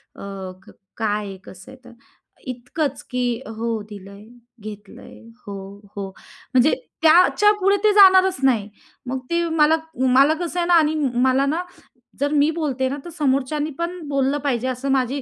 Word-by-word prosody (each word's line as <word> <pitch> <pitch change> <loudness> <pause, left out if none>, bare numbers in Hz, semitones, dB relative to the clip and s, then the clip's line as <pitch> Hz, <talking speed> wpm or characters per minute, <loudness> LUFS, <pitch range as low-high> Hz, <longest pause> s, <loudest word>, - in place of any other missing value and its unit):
अ, 195 -2 -7
क - - -15 0.3
काय 210 -2 0
आहे? 195 -1 -8
कसं 185 0 -13
आहे? 260 - -13
तर 245 - -13 0.6
इतकंच 255 +3 -4
की 245 -2 -1 0.2
"हो 230 +1 -3 0.2
दिलंय, 200 0 -11 0.4
घेतलंय, 210 -1 -11 0.3
हो, 200 - -6 0.4
हो," 195 -1 -5 0.4
म्हणजे 255 +4 +4 0.3
त्याच्यापुढे 395 +4 +4
ते 425 - +5
जाणारच 380 -4 +6
नाही. 225 -6 +2 0.4
मग 260 +1 -3
ते 340 0 +1
मला, 320 0 +4 0.4
मला 280 +4 +6
कसं 350 +1 -3
आहे 345 - 0
ना 350 - +3
आणि 315 -2 +4 0.3
मला 265 +2 +3
ना, 325 +5 -1 0.6
जर 285 +1 0
मी 305 - +2
बोलते 265 -4 -1
ना, 280 - -4
तर - - -7
समोरच्यानी 290 +2 0
पण 350 +1 -3
बोललं 275 0 0
पाहिजे 255 -3 -1
असं 260 +2 -2
माझी 265 +1 0
275 Hz, 160 wpm, -21 LUFS, 240-320 Hz, 0.6 s, जाणारच